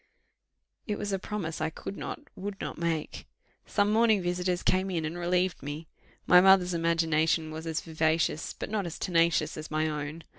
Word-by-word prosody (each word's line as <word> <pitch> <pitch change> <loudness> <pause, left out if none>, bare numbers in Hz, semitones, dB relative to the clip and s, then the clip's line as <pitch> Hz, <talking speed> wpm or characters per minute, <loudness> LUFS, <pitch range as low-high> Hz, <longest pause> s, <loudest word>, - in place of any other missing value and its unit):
It 210 -2 -1
was 205 -1 -3
a 195 - 0
promise 180 -6 -4
I 155 - +1
could 180 +4 -7
not, - - -5 0.2
would 195 +1 -6
not - - -5
make: 165 -2 -2 0.4
some 205 0 +2
morning 220 -2 +4
visitors 180 0 -1
came 185 +1 +2
in 165 -4 -1
and 160 +2 -4
relieved 180 +1 0
me. 145 +3 -6 0.4
My 180 - +8
mother's 190 -1 +5
imagination 165 -1 +1
was 160 +1 -6
as 160 0 -1
vivacious, 160 -1 0
but - - -6
not 205 -4 -1
as 170 - -6
tenacious 170 -2 +1
as 155 - -7
my 155 +1 0
own. 150 +1 -4
170 Hz, 180 wpm, -29 LUFS, 160-185 Hz, 0.4 s, My